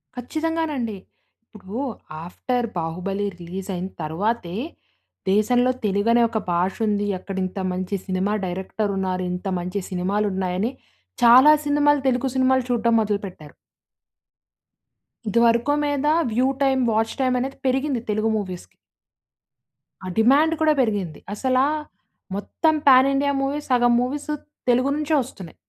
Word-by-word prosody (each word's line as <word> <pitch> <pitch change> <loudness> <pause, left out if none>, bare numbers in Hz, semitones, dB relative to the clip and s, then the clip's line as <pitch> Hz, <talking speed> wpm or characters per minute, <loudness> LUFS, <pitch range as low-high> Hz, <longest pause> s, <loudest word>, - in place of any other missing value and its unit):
ఖచ్చితంగానండి. 300 -4 -2 0.6
ఇప్పుడూ 205 +4 -7 0.4
ఆఫ్టర్ 245 +7 -2
బాహుబలి 185 +5 -3
రిలీజయిన 185 +1 -5
తర్వాతే, 180 +4 -2 0.8
దేశంలో 245 +5 +3
తెలుగనే 210 +4 +2
ఒక 225 - -2
భాషుంది. 205 +4 0
అక్కడ 195 0 -7
ఇంత 185 +1 -6
మంచి 185 +2 -3
సినిమా 190 +3 0
డైరెక్టరున్నారు. 190 0 -2
ఇంత 180 +2 -5
మంచి 180 +3 -3
సినిమాలున్నాయని, 190 +2 -1 0.5
చాలా 255 +6 +8
సినిమాలు 290 -1 +3
తెలుగు 255 +1 +1
సినిమాలు 260 0 +3
చూడ్డం 235 -1 +2
మొదలుపెట్టారు. 200 -8 -4 1.8
ఇదివరకు 235 +5 +3
మీదా 290 +1 +1 0.2
వ్యూ 255 +3 +2
టైమ్, 265 -2 +3
వాచ్ 225 +1 0
టైమనేది 255 +1 0
పెరిగింది 265 -1 0
తెలుగు 215 +1 +1
మూవీస్‌కి. 185 -4 -7 1.3
ఆ - - -5
డిమాండు 290 +8 +4
కూడా 310 -1 +4
పెరిగింది. 200 - -2
అసలా 260 +4 +2 0.7
మొత్తం 315 - 0
పాన్ 260 0 +7
ఇండియా 280 +1 +1
మూవీస్, 285 +1 -3
సగం 240 -1 +4
మూవీసు 290 +4 -3 0.4
తెలుగు 255 +3 +3
నుంచే 305 +1 -1
వస్తున్నాయి. 195 -9 -9
230 Hz, 110 wpm, -23 LUFS, 195-265 Hz, 1.8 s, చాలా